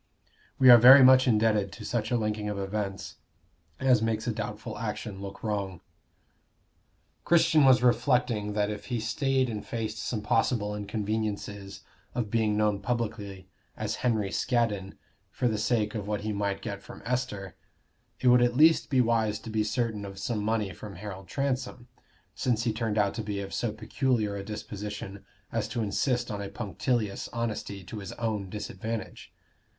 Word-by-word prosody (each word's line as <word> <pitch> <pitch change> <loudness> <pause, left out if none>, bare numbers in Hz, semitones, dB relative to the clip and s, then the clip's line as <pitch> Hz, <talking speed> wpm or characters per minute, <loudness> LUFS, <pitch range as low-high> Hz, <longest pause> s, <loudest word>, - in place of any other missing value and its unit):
We 130 -1 +8
are 120 - +10
very 130 +4 +10
much 130 0 +7
indebted 105 -3 +2
to - - -9
such 115 -2 -1
a 125 - +2
linking 105 -1 -2
of 105 - -3
events 100 0 -4 0.6
as 130 -4 +4
makes 110 -1 -1
a 120 - 0
doubtful 105 +1 -5
action 105 -2 -5
look 100 0 -8
wrong. 100 -5 -2 1.4
Christian 160 -3 +4
was 130 -2 +6
reflecting 120 -3 +2
that 105 0 0
if 105 -1 -7
he 120 +2 -2
stayed 130 +3 +1
and 110 -3 -4
faced 110 -4 -4
some 105 +1 -3
possible 105 -2 +1
inconveniences 105 -1 -4 0.3
of 110 -4 -2
being 110 -2 +1
known 105 -2 +2
publicly 105 -4 -3 0.3
as - - -3
Henry 110 -5 0
Scaddon 105 -7 0 0.3
for 125 - -1
the 110 -2 0
sake 105 -1 +1
of 105 -3 -4
what 105 -1 -2
he 105 0 -2
might 100 -1 -2
get - - -5
from - - -12
Esther, 115 -7 -3 0.6
it - - 0
would 125 0 +6
at 120 0 +2
least 160 +2 +5
be 130 -3 +4
wise 115 -3 +1
to 110 +1 -9
be 110 0 +1
certain 110 -1 -1
of 100 -1 -8
some 105 +2 -2
money 105 -3 0
from 100 +3 -9
Harold 95 0 -8
Transome, 125 0 -3 0.4
since 115 -3 0
he 115 -2 0
turned 110 -1 -2
out 100 -2 +2
to - - -4
be 105 -2 -4
of 100 -1 -6
so 110 +3 -1
peculiar 110 -1 -1
a 100 - -5
disposition 105 -1 -6 0.3
as 110 -2 -1
to 115 +1 -2
insist 120 +4 0
on 100 -1 -4
a 100 - -5
punctilious 105 0 -2
honesty 110 -4 -4
to 105 +4 -7
his 95 -2 -7
own 105 -5 -3
disadvantage. 105 +2 -6
110 Hz, 170 wpm, -28 LUFS, 105-120 Hz, 1.4 s, are